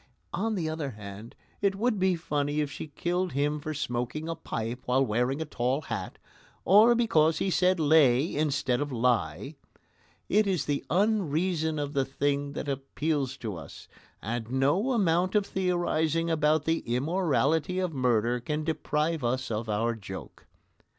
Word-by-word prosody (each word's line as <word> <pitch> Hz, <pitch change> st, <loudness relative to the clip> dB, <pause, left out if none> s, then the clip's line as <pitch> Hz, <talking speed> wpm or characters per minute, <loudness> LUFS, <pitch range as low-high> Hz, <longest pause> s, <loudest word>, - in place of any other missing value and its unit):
On 220 Hz, +2 st, -1 dB
the 170 Hz, -5 st, -1 dB
other 155 Hz, -3 st, -3 dB
hand, 105 Hz, 0 st, -10 dB, 0.3 s
it 200 Hz, -1 st, +2 dB
would 220 Hz, 0 st, 0 dB
be 185 Hz, -1 st, +3 dB
funny 145 Hz, -3 st, -1 dB
if 145 Hz, -2 st, -1 dB
she -, -, -6 dB
killed 175 Hz, +4 st, -2 dB
him 145 Hz, +2 st, 0 dB
for 155 Hz, +1 st, -5 dB
smoking 125 Hz, +1 st, -3 dB
a 165 Hz, -, -1 dB
pipe 120 Hz, -6 st, -4 dB
while 130 Hz, +2 st, +2 dB
wearing 125 Hz, +5 st, 0 dB
a 160 Hz, -, -2 dB
tall 130 Hz, 0 st, -1 dB
hat, 110 Hz, -9 st, -5 dB, 0.5 s
or 215 Hz, +6 st, +7 dB
because 165 Hz, -9 st, +3 dB
he 190 Hz, -, 0 dB
said 185 Hz, 0 st, +3 dB
"lay" 150 Hz, -2 st, +4 dB
instead 140 Hz, -4 st, 0 dB
of 145 Hz, -1 st, -2 dB
"lie." 115 Hz, -, 0 dB, 0.7 s
It 210 Hz, +1 st, +3 dB
is 180 Hz, -7 st, 0 dB
the 145 Hz, -1 st, -1 dB
unreason 175 Hz, -4 st, +1 dB
of 145 Hz, 0 st, -3 dB
the 135 Hz, -2 st, +2 dB
thing 140 Hz, +1 st, -1 dB
that 145 Hz, -, -5 dB
appeals 140 Hz, 0 st, -2 dB
to 105 Hz, -4 st, -3 dB
us, 80 Hz, -4 st, -10 dB, 0.4 s
and 115 Hz, +1 st, -3 dB
no 145 Hz, -, +2 dB
amount 185 Hz, -3 st, +2 dB
of 205 Hz, -1 st, +3 dB
theorising 170 Hz, -3 st, 0 dB
about 155 Hz, -1 st, +2 dB
the 165 Hz, 0 st, +1 dB
immorality 155 Hz, +4 st, 0 dB
of 185 Hz, -3 st, -1 dB
murder 120 Hz, -2 st, +1 dB
can 150 Hz, +5 st, -3 dB
deprive 155 Hz, -1 st, -1 dB
us 130 Hz, +1 st, -1 dB
of 110 Hz, +1 st, -3 dB
our 115 Hz, +3 st, +1 dB
joke. 95 Hz, -4 st, -9 dB
150 Hz, 160 wpm, -28 LUFS, 125-170 Hz, 0.7 s, or